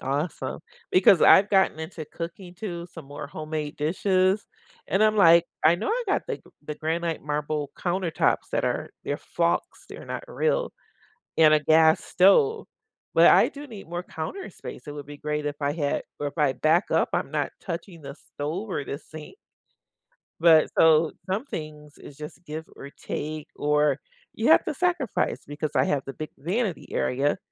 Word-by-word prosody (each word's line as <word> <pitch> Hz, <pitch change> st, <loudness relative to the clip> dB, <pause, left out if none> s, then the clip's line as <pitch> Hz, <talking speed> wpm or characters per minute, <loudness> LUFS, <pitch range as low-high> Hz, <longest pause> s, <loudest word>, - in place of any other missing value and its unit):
awesome, 145 Hz, +5 st, -3 dB, 0.3 s
because 185 Hz, -1 st, +6 dB
I've 195 Hz, +2 st, +7 dB
gotten 190 Hz, -5 st, +3 dB
into 160 Hz, -1 st, -6 dB
cooking 175 Hz, +3 st, -8 dB
too, 175 Hz, -4 st, -6 dB
some 165 Hz, -4 st, -10 dB
more 145 Hz, 0 st, -7 dB
homemade 155 Hz, 0 st, -5 dB
dishes, 185 Hz, +5 st, +1 dB, 0.4 s
and 195 Hz, +3 st, +1 dB
I'm 215 Hz, 0 st, +4 dB
like, 170 Hz, -3 st, +6 dB, 0.2 s
I 160 Hz, +2 st, +7 dB
know 200 Hz, -, -3 dB
I 485 Hz, +2 st, 0 dB
got 390 Hz, -, +1 dB
the -, -, -2 dB
g -, -, -25 dB, 0.2 s
the 150 Hz, 0 st, -5 dB
granite 165 Hz, +1 st, -2 dB
marble 150 Hz, -1 st, -2 dB
countertops 175 Hz, -2 st, 0 dB
that -, -, 0 dB
are -, -, -2 dB
they're -, -, -2 dB
flocks, -, -, -2 dB
they're -, -, -10 dB
not -, -, -5 dB
real, -, -, 0 dB, 0.6 s
and 155 Hz, -1 st, +6 dB
a 155 Hz, -, +6 dB
gas 160 Hz, +2 st, +4 dB
stove, 430 Hz, -, +4 dB, 0.5 s
but -, -, +6 dB
I -, -, +6 dB
do 290 Hz, +1 st, -10 dB
need 210 Hz, -, -11 dB
more 175 Hz, +1 st, -4 dB
counter 370 Hz, -, -6 dB
space. -, -, -10 dB
It 145 Hz, -, -7 dB
would 145 Hz, -1 st, -8 dB
be 145 Hz, -, -9 dB
great 150 Hz, 0 st, -3 dB
if 145 Hz, 0 st, -3 dB
I 145 Hz, 0 st, 0 dB
had 145 Hz, -2 st, -1 dB, 0.2 s
or 145 Hz, -, -1 dB
if 150 Hz, -, -13 dB
I 145 Hz, -3 st, +3 dB
back 160 Hz, +6 st, +2 dB
up, -, -, +3 dB
I'm -, -, -2 dB
not -, -, -1 dB
touching 170 Hz, -2 st, -7 dB
the 140 Hz, 0 st, -8 dB
stove, 160 Hz, +8 st, -6 dB
or 145 Hz, -, -2 dB
the 140 Hz, -, -5 dB
sink 155 Hz, -, -11 dB, 1.1 s
but, 160 Hz, -2 st, +6 dB
so 160 Hz, 0 st, +5 dB, 0.2 s
some 210 Hz, +8 st, -1 dB
things 150 Hz, -, -8 dB
is 140 Hz, -, -12 dB
just 150 Hz, +3 st, -10 dB
give, 155 Hz, +1 st, -6 dB
or 140 Hz, -, -9 dB
take, 155 Hz, +1 st, -6 dB
or 150 Hz, -1 st, +2 dB, 0.3 s
you -, -, 0 dB
have -, -, +6 dB
to -, -, -3 dB
sacrifice, 350 Hz, -, 0 dB
because 145 Hz, +1 st, -4 dB
I -, -, +4 dB
have 140 Hz, -2 st, 0 dB
the 135 Hz, -, -5 dB
big 155 Hz, +3 st, -7 dB
vanity 185 Hz, -, -2 dB
area, 140 Hz, +7 st, 0 dB
160 Hz, 180 wpm, -25 LUFS, 150-185 Hz, 1.1 s, I've